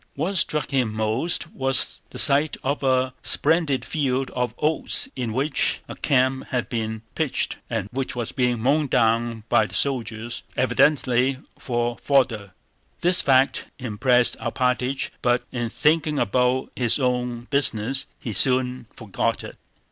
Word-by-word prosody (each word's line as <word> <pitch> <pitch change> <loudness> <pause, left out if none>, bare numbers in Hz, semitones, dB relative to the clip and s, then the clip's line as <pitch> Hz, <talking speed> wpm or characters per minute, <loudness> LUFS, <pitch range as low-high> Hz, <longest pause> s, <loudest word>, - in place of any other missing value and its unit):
What 165 +8 -2
struck 155 -4 +1
him 130 -5 +1
most 110 +10 -1
was 135 0 0
the - - -10
sight 145 +2 +5
of 140 +2 -1
a 130 -1 +1
splendid 160 -5 +2
field 135 -3 -1
of 125 -1 -2
oats 155 -1 0
in 125 -4 -3
which 135 +5 0
a - - -8
camp 130 -1 +1
had 125 -2 -2
been 110 -2 -3
pitched - - -1
and - - -2
which 130 0 -3
was 120 -2 -3
being 125 -2 0
mown 145 +6 +2
down 115 -1 +1
by 110 -1 +3
the - - -8
soldiers, 115 -4 -2 0.2
evidently 130 -1 +2 0.2
for 120 -1 -2
fodder. 120 -8 +1 0.5
This 180 +1 +4
fact 135 0 +2
impressed 125 0 +1
Alpátych, 125 +1 -1
but 120 0 +1
in 120 -2 -3
thinking 150 +3 +1
about 125 +3 +1
his 120 -3 +1
own 125 -3 -1
business 135 -2 +1
he 115 - -5
soon 125 +2 +1
forgot 110 -4 -2
it. - - -9
130 Hz, 140 wpm, -23 LUFS, 120-135 Hz, 0.5 s, sight